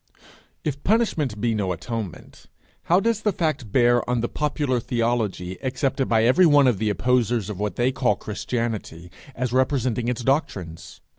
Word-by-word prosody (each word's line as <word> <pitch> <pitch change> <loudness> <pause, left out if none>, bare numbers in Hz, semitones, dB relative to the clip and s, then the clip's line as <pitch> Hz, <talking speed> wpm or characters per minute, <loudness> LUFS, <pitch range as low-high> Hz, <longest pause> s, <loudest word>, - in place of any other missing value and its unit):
If 140 -2 -3
punishment 165 - +1
be 115 +2 +1
no 100 -4 -1
atonement, 105 +1 -6 0.4
how 175 +2 +4
does 225 +1 0
the 210 - +1
fact 155 - -2
bear 120 0 +3
on 125 -2 +1
the 120 - 0
popular 145 -3 -1
theology 115 -6 -2
accepted 135 0 -1
by 110 -1 +3
every 150 +10 +5
one 145 -2 +5
of 120 -7 +2
the 110 0 0
opposers 120 -1 +1
of 100 - -7
what 105 -3 -2
they 125 +2 +1
call 130 -1 +1
Christianity, 105 -6 -4 0.2
as 125 -1 -2
representing 130 -3 +1
its 125 -1 -2
doctrines? 90 - -2
120 Hz, 160 wpm, -23 LUFS, 110-135 Hz, 0.4 s, every